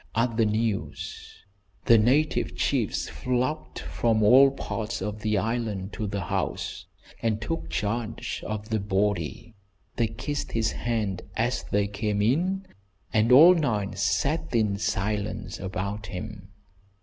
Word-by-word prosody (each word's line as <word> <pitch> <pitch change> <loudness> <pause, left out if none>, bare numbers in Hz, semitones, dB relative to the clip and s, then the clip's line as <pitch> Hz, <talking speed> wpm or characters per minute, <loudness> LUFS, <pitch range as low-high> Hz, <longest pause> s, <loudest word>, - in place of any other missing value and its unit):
At 115 0 +1
the 115 -1 +3
news 110 -1 -3 0.4
the 115 -1 +7
native 140 +8 +2
chiefs - - 0
flocked 130 +5 -2
from 110 -2 0
all 130 +6 +8
parts 115 -4 -4
of 105 +2 -4
the 110 -2 +1
island 105 -2 -2
to 110 - -3
the 100 0 -3
house, 95 +1 -3 0.3
and 110 -2 0
took 165 +8 -4
charge 115 +2 -3
of 110 0 -4
the 110 -1 +1
body. 100 +1 -1 0.4
They 115 - +2
kissed 145 +7 -4
his 110 -1 +1
hand 110 -6 -2 0.2
as 120 +3 +1
they 100 0 +2
came 105 +1 -2
in, 175 - +1 0.5
and 110 +2 +3
all 160 +8 +10
night 110 - -1
sat 150 -3 0
in 105 -3 +2
silence 105 -2 -2
about 100 +3 -4
him. 100 0 -7
110 Hz, 135 wpm, -26 LUFS, 105-120 Hz, 0.5 s, all